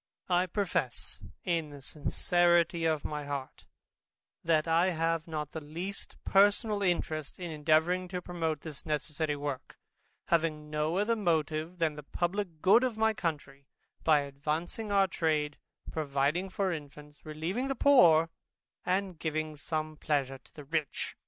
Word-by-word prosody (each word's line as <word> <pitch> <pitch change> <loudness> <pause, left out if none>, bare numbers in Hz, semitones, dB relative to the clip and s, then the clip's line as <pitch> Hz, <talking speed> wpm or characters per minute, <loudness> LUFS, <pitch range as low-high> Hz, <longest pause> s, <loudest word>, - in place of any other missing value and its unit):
I 180 +1 +3
profess 175 - -2 0.2
in 165 -4 0
the 145 -1 -10
sincerity 170 +4 +2
of 155 -2 +1
my 150 -1 -3
heart, 140 -2 -6 0.8
that 160 -1 +2
I 165 +3 +4
have 165 -1 0
not 150 -2 -4
the 160 - -5
least 170 +7 -6
personal 205 +2 +4
interest 160 -5 -1
in 175 -2 -5
endeavouring 160 +4 +2
to 180 0 -3
promote 165 -4 -2
this 155 -3 -8
necessary 150 0 -1
work, 145 -2 -5 0.5
having 155 -2 +1
no 155 +3 0
other 210 +3 +2
motive 160 -3 0
than 165 -3 +1
the - - -5
publick 175 +2 -3
good 200 +6 +6
of 250 -4 -1
my 220 0 +3
country, 140 -7 -4 0.4
by 155 -2 +5
advancing 150 +9 -3
our 200 -1 +5
trade, 155 -4 0 0.3
providing 150 +4 0
for 195 0 0
infants, 150 -1 -10
relieving 165 - -3
the 270 - -1
poor, 170 - +6 0.5
and 185 -2 -1
giving 155 -1 -2
some 155 +1 -3
pleasure 135 -4 -1
to - - -26
the 150 - -9
rich. 150 0 -2
160 Hz, 145 wpm, -31 LUFS, 150-180 Hz, 0.8 s, good